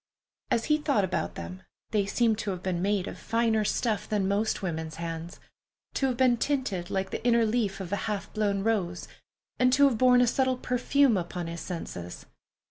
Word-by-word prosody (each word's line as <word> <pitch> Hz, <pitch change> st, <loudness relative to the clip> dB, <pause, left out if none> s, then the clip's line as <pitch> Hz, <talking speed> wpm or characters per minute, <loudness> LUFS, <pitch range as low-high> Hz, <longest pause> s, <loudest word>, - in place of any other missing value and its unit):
As 230 Hz, -, +1 dB
he 300 Hz, 0 st, +2 dB
thought 280 Hz, -9 st, +1 dB
about 180 Hz, -, -2 dB
them, 85 Hz, +2 st, -7 dB, 0.3 s
they 205 Hz, -2 st, +1 dB
seemed 225 Hz, 0 st, +2 dB
to 215 Hz, -, -3 dB
have 185 Hz, -2 st, -4 dB
been 180 Hz, -2 st, -1 dB
made 200 Hz, -1 st, +1 dB
of -, -, -7 dB
finer 225 Hz, -1 st, +1 dB
stuff 215 Hz, 0 st, -1 dB
than 205 Hz, -3 st, +1 dB
most 205 Hz, +1 st, 0 dB
women's 160 Hz, -3 st, -3 dB
hands; 165 Hz, +1 st, -6 dB, 0.5 s
to 270 Hz, -, +1 dB
have 250 Hz, -2 st, -1 dB
been 250 Hz, -2 st, +4 dB
tinted 225 Hz, -10 st, -1 dB
like 190 Hz, -1 st, -2 dB
the -, -, -4 dB
inner 235 Hz, -1 st, +4 dB
leaf 215 Hz, -3 st, 0 dB
of 190 Hz, -2 st, -6 dB
a 205 Hz, -, -2 dB
half 205 Hz, -2 st, -4 dB
blown 200 Hz, -2 st, 0 dB
rose, 190 Hz, -6 st, -1 dB, 0.5 s
and 250 Hz, 0 st, +4 dB
to 280 Hz, +1 st, +6 dB
have 240 Hz, -5 st, -1 dB
borne 250 Hz, -1 st, +6 dB
a -, -, +5 dB
subtle 260 Hz, +1 st, +1 dB
perfume 250 Hz, -1 st, +2 dB
upon 175 Hz, 0 st, -4 dB
his 165 Hz, 0 st, -5 dB
senses. 90 Hz, -, -6 dB
210 Hz, 195 wpm, -28 LUFS, 180-240 Hz, 0.5 s, to